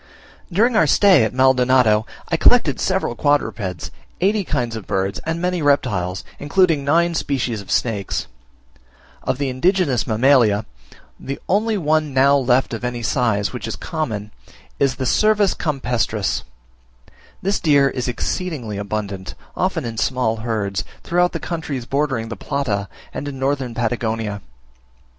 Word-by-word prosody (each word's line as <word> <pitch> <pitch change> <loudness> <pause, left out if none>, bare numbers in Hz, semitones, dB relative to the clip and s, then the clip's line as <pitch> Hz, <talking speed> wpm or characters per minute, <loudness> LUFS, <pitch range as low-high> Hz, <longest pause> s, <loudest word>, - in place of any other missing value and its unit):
During 225 +7 +3
our 190 -8 +4
stay 185 - +5
at 110 - 0
Maldonado 125 -4 +3 0.2
I - - +1
collected - - +4
several - - 0
quadrupeds, 115 - -1 0.3
eighty 200 +3 +2
kinds 120 -8 -2
of 110 -4 -7
birds, 95 0 -1
and 165 +1 -1
many 180 0 -1
reptiles, 95 -11 +1 0.2
including 155 0 +2
nine 170 +4 +2
species 125 -8 -1
of 100 - -15
snakes. 105 -5 -1 1.0
Of - - -1
the 140 0 -1
indigenous 140 - +1
mammalia, 110 -3 +3 0.5
the 135 +1 -5
only 215 +3 +1
one 155 -4 0
now 140 +2 +5
left 130 -2 +2
of 115 - -5
any 120 -1 -3
size, 110 -4 0
which 125 -2 -5
is 115 - -4
common, 110 - -4 0.5
is 135 -2 +2
the 130 +1 -3
Cervus 210 - +3
campestris. 120 - -1 1.0
This 195 +2 +1
deer 145 -4 +4
is 130 -2 -3
exceedingly 125 - -3
abundant, 100 -2 -4 0.2
often 180 -6 -1
in 115 -1 -5
small 120 -1 0
herds, 105 -4 -2 0.2
throughout 175 +1 +2
the - - -4
countries 155 -7 -4
bordering 135 -4 -1
the 115 - -4
Plata 105 -5 -2 0.2
and 145 - -5
in 140 -2 -5
Northern 135 -3 -1
Patagonia. 110 -3 -2
130 Hz, 140 wpm, -20 LUFS, 110-155 Hz, 1.0 s, stay